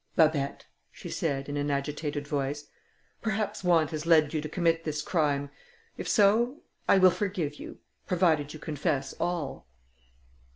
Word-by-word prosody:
"Babet," 150 -4 +2 0.3
she - - -9
said, 140 -4 -1
in 145 0 -3
an 145 0 -1
agitated 145 +1 -2
voice, 145 0 -2 0.6
"perhaps 215 -2 -2
want 165 -4 +3
has 155 +1 -4
led 155 -3 +5
you 155 - 0
to 155 - -5
commit 165 -1 +1
this 150 -2 -2
crime; 145 -4 0 0.4
if - - -5
so, 230 +7 +3 0.3
I - - +7
will 185 -1 +7
forgive 175 -8 -2
you, - - -9 0.3
provided 160 -5 +2
you 155 - -8
confess 150 -2 -2
all." 165 - -3
155 Hz, 150 wpm, -28 LUFS, 145-175 Hz, 0.6 s, I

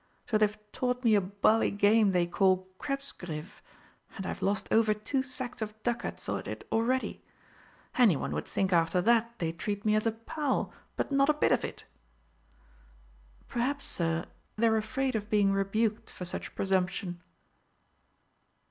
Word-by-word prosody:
So 215 - +4
they've 210 0 +2
taught 250 0 -1
me 230 -2 +5
a 205 - +5
bally 200 +4 +2
game 205 +1 +4
they 180 -2 +2
call 185 +1 +2
'Krebsgriff,' 195 - -5 0.6
and 190 - -5
I've - - -4
lost 200 +1 +1
over 220 -1 +4
two 260 +6 -1
sacks 255 -2 -4
of 215 -1 -4
ducats 240 -1 -2
at - - -3
it - - -6
already. 250 +3 0 0.8
Anyone 210 - +4
would - - -3
think 190 -1 0
after 165 +1 +3
that 235 +3 +2
they'd 165 -3 -3
treat 205 +3 -3
me 215 - +4
as 215 +1 +2
a - - +3
pal, 270 +6 -2 0.2
but - - -2
not 275 +1 +4
a 305 - +4
bit 300 - +2
of - - +3
it!" - - -6 1.6
"Perhaps, 275 +4 -1
Sir, 165 -1 -1 0.3
they're 225 0 +3
afraid 255 +4 -1
of 210 -1 -3
being 205 -2 +3
rebuked 210 +3 0
for 180 - -7
such 180 - -4
presumption." 185 -2 -1
215 Hz, 155 wpm, -30 LUFS, 190-240 Hz, 1.6 s, me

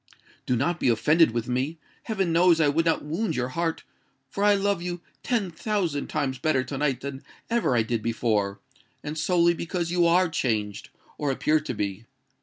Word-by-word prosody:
Do 125 - +2
not 170 +8 0
be - - +2
offended 150 +8 +4
with 115 0 -3
me:—heaven 160 - -3
knows 170 0 +5
I 150 -2 +4
would 165 +3 +1
not 165 - +1
wound 170 +9 -2
your 125 0 -1
heart; 165 +4 -2 0.5
for 200 - -2
I 205 0 +5
love 200 -2 0
you 175 0 -4 0.2
ten 225 -8 -1
thousand 170 -5 -2
times 130 -2 -2
better 135 -2 +1
to 135 +2 -5
night 140 -4 0
than 140 -1 -6 0.3
ever 235 - +2
I 115 - +3
did 115 0 -2
before—and 115 +5 -3
solely 170 +1 +3
because 170 0 -3
you 175 -1 +3
are 180 +2 +4
changed, 110 - -2 0.3
or 145 - 0
appear 150 +3 +2
to 150 -5 -5
be. 105 +1 -3
150 Hz, 180 wpm, -26 LUFS, 125-175 Hz, 0.5 s, knows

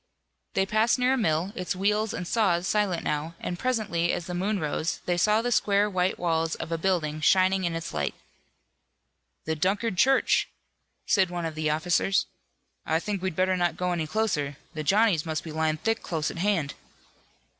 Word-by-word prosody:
They 195 - +3
passed 215 +5 +2
near 250 +1 +2
a - - +3
mill, 175 -5 0
its 180 +1 -3
wheels 210 +3 +1
and 180 - -5
saws 190 -5 +1
silent 205 -5 0
now, 150 +3 -2
and 175 - -4
presently 215 -9 0
as 175 - -3
the 180 - -5
moon 195 +3 -1
rose 155 +1 -2
they 175 - +1
saw 210 +5 +3
the 245 - -1
square 205 -2 +3
white 185 -2 0
walls 165 -2 0
of - - -6
a 165 - 0
building 160 -4 0
shining 190 +2 +3
in 170 -1 -1
its 165 0 -5
light. 75 -2 -2 1.3
"The 160 - -1
Dunkard 195 +4 0
church," 270 +1 +3 0.6
said 190 -4 +3
one 175 -1 -3
of 160 - -3
the 155 0 -1
officers. 175 +5 +1 0.6
"I 160 +1 +1
think 200 +1 -3
we'd 190 -3 -2
better 185 +1 +2
not 175 -1 0
go 180 0 -1
any 165 -3 -1
closer. 150 -8 -1 0.2
The 155 - -4
Johnnies 195 -1 +3
must 160 -2 -3
be 160 - -7
lying 155 0 0
thick 225 +7 -1
close 160 -3 -2
at - - -9
hand." 175 -7 0
180 Hz, 190 wpm, -27 LUFS, 160-205 Hz, 1.3 s, They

